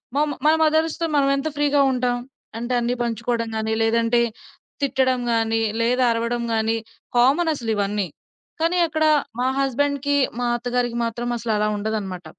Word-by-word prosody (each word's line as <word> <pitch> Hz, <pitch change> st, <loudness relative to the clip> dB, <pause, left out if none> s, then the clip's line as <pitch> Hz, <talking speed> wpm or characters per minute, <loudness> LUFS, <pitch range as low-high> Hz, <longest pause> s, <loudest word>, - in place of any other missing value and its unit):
మా 290 Hz, -, +3 dB, 0.2 s
మన 310 Hz, -, +6 dB
మదర్స్‌తో 315 Hz, +1 st, +1 dB
మనమెంత 275 Hz, +1 st, +2 dB
ఫ్రీగా 290 Hz, -1 st, +2 dB
ఉంటాం? 250 Hz, -1 st, 0 dB, 0.4 s
అంటే 240 Hz, +2 st, -3 dB
అన్నీ 240 Hz, +1 st, 0 dB
పంచుకోవడం 230 Hz, 0 st, -1 dB
గాని, 220 Hz, 0 st, -1 dB
లేదంటే 230 Hz, +1 st, +2 dB, 0.6 s
తిట్టడం 260 Hz, -2 st, +1 dB
గాని, 225 Hz, 0 st, +1 dB, 0.2 s
లేదా 250 Hz, +2 st, +2 dB
అరవడం 235 Hz, +1 st, -1 dB
గానీ, 225 Hz, +1 st, +1 dB, 0.4 s
కామనసలివన్నీ. 230 Hz, -, +1 dB, 0.5 s
కానీ 335 Hz, +2 st, +1 dB
అక్కడ 315 Hz, 0 st, 0 dB, 0.3 s
మా 255 Hz, -, +1 dB
హస్బెండ్‌కి 285 Hz, +1 st, 0 dB, 0.2 s
మా 245 Hz, -, -1 dB
అత్తగారికి 245 Hz, 0 st, -1 dB
మాత్రం 240 Hz, +1 st, -3 dB
అసలలా 215 Hz, -2 st, 0 dB
ఉండదన్నమాట. 205 Hz, -4 st, -4 dB
240 Hz, 125 wpm, -22 LUFS, 225-275 Hz, 0.6 s, మన